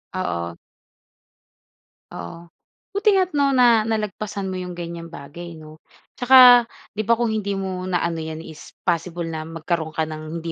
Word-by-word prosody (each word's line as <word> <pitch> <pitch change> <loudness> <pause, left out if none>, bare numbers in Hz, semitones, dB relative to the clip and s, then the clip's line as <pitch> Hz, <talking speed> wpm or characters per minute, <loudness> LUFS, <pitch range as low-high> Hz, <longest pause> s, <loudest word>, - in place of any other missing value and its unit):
Oo. 85 - -3 1.6
Oo. 165 - -9 0.4
Buti 410 +1 +2
nga 380 - +5
at 365 - -7
'no 280 -2 +2
na 235 -3 +5
nalagpasan 210 -2 -3
mo 185 - -4
iyong 180 -1 -6
ganyang 170 -1 -6
bagay 170 +2 -9
'no. 155 0 -13 0.3
At - - -55
saka 260 0 +9 0.5
di 215 +1 -4
ba 235 - +5
kung 235 -1 0
hindi 200 -2 -2
mo 185 -1 -4
na-ano 170 -2 -1
yan 160 0 -6
is 160 -2 -12
possible 170 0 -1
na 160 -1 -5
magkaroon 165 -1 -3
ka 160 - +1
ng 155 +1 -6
hindi 165 - -3
175 Hz, 165 wpm, -22 LUFS, 160-210 Hz, 1.6 s, saka